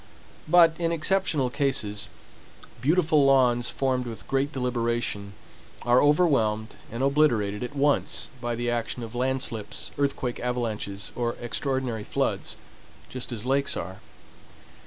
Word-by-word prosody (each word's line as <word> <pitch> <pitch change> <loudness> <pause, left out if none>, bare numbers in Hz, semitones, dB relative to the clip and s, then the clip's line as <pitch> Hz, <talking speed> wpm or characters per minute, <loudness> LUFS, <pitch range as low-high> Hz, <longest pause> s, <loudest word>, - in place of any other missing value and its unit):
But, 165 0 +6
in 165 -1 +1
exceptional 160 -5 +1
cases, 110 -8 -1 0.7
beautiful 155 0 +3
lawns 125 -3 +4
formed 130 -2 0
with 110 -4 -8
great 135 +1 0
deliberation 120 -6 -1 0.5
are 120 +1 +5
overwhelmed 135 -9 +2 0.2
and 115 +4 -3
obliterated 120 -8 +2
at 125 +4 -5
once 145 +1 +1
by 120 0 -2
the 120 +1 -1
action 120 +1 -2
of 115 - -8
land 130 +2 0
slips, 105 -4 -3
earthquake 135 -3 -1
avalanches, 110 -5 -3
or 120 -1 -1
extraordinary 125 -2 -2
floods, - - -1 0.5
just 130 0 -5
as 115 -1 -4
lakes 135 +2 +1
are. 95 +3 -6
125 Hz, 125 wpm, -26 LUFS, 115-140 Hz, 0.7 s, But